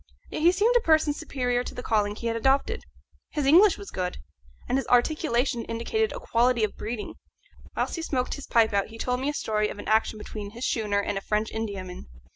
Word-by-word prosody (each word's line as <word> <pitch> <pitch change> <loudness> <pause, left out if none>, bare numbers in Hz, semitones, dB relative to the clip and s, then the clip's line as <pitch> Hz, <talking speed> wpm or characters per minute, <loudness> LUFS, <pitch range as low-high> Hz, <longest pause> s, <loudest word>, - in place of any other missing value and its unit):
Yet - - -3
he 340 +2 +6
seemed 425 +6 +2
a - - +7
person 315 -7 +3
superior 250 -4 -1
to - - -8
the 250 - -6
calling 210 -2 +1
he 235 - -8
had 230 0 0
adopted. 275 - +1 0.5
His 295 -3 -1
English 350 +7 +6
was 200 - -9
good, 180 -1 -3 0.5
and 260 - +1
his - - -5
articulation 245 -2 +2
indicated 425 - -1
a - - -6
quality 245 - +2
of 215 - -1
breeding. 215 -1 -5 0.6
Whilst - - -1
he - - -3
smoked 260 -6 -1
his 285 - -7
pipe 225 -2 +3
out 200 -1 +1
he 225 - -11
told 250 +2 -1
me 270 +2 -1
a - - -2
story 215 -3 0
of - - -7
an - - -8
action 220 0 +2
between 210 0 -7
this 235 - -3
schooner 210 -3 0
and 200 -1 -2
a - - -15
French 210 +2 -1
Indiaman. 195 - -5
235 Hz, 220 wpm, -26 LUFS, 215-290 Hz, 0.6 s, a